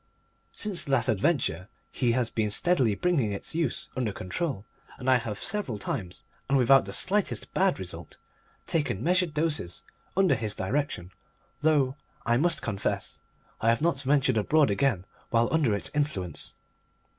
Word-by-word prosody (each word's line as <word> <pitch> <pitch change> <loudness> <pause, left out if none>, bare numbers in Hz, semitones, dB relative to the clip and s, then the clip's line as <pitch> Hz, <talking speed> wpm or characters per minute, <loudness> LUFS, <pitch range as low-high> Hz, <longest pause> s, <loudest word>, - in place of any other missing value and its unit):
Since 210 -4 -1
that 135 -4 +1
adventure 105 - 0 0.2
he 120 -3 +1
has 120 -2 +1
been 110 -2 0
steadily 130 - +2
bringing 135 - +1
its 100 - -1
use 160 -5 +1
under 120 -4 -1
control, 100 - -3 0.3
and 130 - -7
I 130 -1 +6
have 115 -4 -5
several 195 - +1
times, 95 -2 -5 0.3
and 140 - +4
without 135 -2 +5
the 100 - -6
slightest 200 - -1
bad 190 0 +2
result, 85 -3 -7 0.5
taken 145 - -1
measured 180 -2 +1
doses 150 - -1 0.3
under 190 -6 +4
his 110 -5 -1
direction; 95 -4 -2 0.5
though 145 -3 +2 0.3
I 120 0 +3
must 165 +3 +1
confess 100 -4 -3 0.4
I 115 - +3
have 115 +6 +2
not 170 -4 +2
yet 140 - -6
ventured 135 -3 +3
abroad 150 +2 +3
again 105 -5 +1 0.2
while 115 +3 +2
under 140 -10 +3
its 100 - -5
influence. 120 - -2
130 Hz, 155 wpm, -28 LUFS, 105-155 Hz, 0.5 s, I